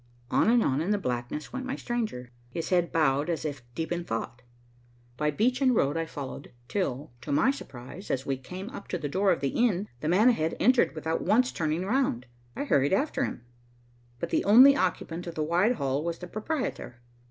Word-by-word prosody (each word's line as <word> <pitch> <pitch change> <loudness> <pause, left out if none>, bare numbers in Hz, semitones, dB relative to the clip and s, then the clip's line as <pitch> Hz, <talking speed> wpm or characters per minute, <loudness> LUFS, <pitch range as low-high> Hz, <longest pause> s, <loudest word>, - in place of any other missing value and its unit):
On - - +3
and 235 -1 +4
on 135 +3 +1
in 170 - -2
the 210 - +3
blackness 125 -3 -4
went 260 0 -3
my 265 - -2
stranger, 215 - -3 0.2
his 165 +6 -4
head 175 -2 +2
bowed 145 -1 +2
as 165 -2 -2
if 145 -2 -3
in 125 - -27
deep 170 +1 -3
thought. 115 +2 -4 0.7
By 150 +3 0
beach 245 - +1
and 255 -2 +4
road 145 -6 +2
I 165 0 -1
followed, 140 -3 -7 0.2
till, 145 -4 -2
to 125 - -6
my 150 - +4
surprise, 175 - -9
as 130 - -1
we 135 - 0
came 185 - -8
up 235 - -9
to 180 - -2
the 150 - -4
door 190 +6 +2
of - - 0
the 140 - +1
inn, 210 - +1
the 150 - -3
man 205 +8 +5
ahead 160 -9 0
entered 255 -8 +4
without 160 +1 -2
once 250 +4 +3
turning 160 +3 -1
round. 205 - 0 0.3
I - - -2
hurried 140 - +2
after 275 +5 +1
him, 120 - -7 0.7
but - - -4
the - - +2
only 255 +7 +8
occupant 175 -3 -2
of 170 - -6
the 155 - -1
wide 175 +9 +3
hall 140 - -1
was 170 0 -2
the 180 - -8
proprietor. 215 - -4
170 Hz, 210 wpm, -28 LUFS, 140-220 Hz, 0.7 s, only